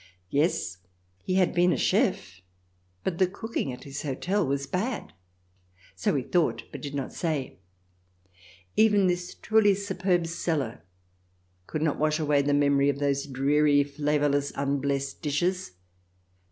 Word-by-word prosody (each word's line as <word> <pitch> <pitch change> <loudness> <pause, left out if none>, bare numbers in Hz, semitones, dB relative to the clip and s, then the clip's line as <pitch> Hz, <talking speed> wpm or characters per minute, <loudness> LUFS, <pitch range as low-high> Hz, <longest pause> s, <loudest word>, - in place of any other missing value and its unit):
Yes, 140 - 0 0.4
he 185 - -2
had 185 -2 +3
been 180 +1 +4
a - - +1
chef, 100 - 0 0.6
but 170 -3 -2
the 185 - +5
cooking 200 - -4
at 125 - -9
his 140 0 -6
hotel 180 +8 -1
was 140 -1 -1
bad 210 - -3 0.4
— 90 0 -30
so 95 - 0
we 135 - 0
thought, 170 +4 +1
but - - -8
did 145 -1 -5
not 135 -2 -4
say. 150 - -3 1.2
Even 210 -3 +4
this 180 0 -1
truly 215 -2 +3
superb 190 -3 0
cellar 160 - -2 0.9
cannot 155 -1 -1
wash 155 0 +2
away 150 -2 +2
the 145 +1 0
memory 140 -1 +3
of 140 - 0
those 140 0 0
dreary, 145 +2 +3
flavourless, 145 0 0
unblessed 140 0 -1
dishes. 175 - -1
145 Hz, 140 wpm, -27 LUFS, 140-180 Hz, 1.2 s, the